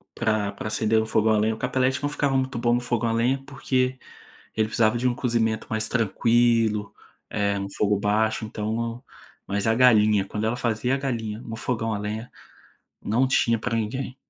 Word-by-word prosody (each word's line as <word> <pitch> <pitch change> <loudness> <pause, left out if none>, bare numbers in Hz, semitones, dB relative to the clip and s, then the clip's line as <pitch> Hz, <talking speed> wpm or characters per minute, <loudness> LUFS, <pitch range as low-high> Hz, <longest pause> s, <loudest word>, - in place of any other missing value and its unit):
pra 110 -3 0
pra 100 - -7
acender 110 +1 +1
no 110 - 0
fogão 110 0 +2
lenha, 110 +1 +1
o - - -12
Capelete 130 +2 0
não 145 - +1
ficava 140 -2 0
muito 130 -1 -2
bom 120 0 +2
no - - +1
fogão 120 -2 -1
a - - 0
lenha, 125 +4 +1
porque 130 -2 -1 0.6
ele 110 0 +1
precisava 110 0 +2
de 125 +2 0
um 120 - 0
cozimento 115 -3 0
mais 110 0 -1
tranquilo, 115 -2 +2 0.4
eh, 100 -1 0
no 100 - -4
fogo 105 -1 +1
baixo 110 +1 +1
então, 115 +3 -3 0.4
mas 100 +2 -1
a 110 - +4
galinha, 110 -5 +5
quando 105 +2 -3
ela 115 +2 0
fazia 120 +1 0
a - - -1
galinha 115 -5 -3
no 115 -2 -7
fogão 115 -2 -2
a 105 - -4
lenha, 110 +3 -5 0.7
não 125 +5 +1
tinha 115 -3 +2
para 115 +1 -2
ninguém. 125 +4 -3
115 Hz, 190 wpm, -24 LUFS, 110-125 Hz, 0.7 s, galinha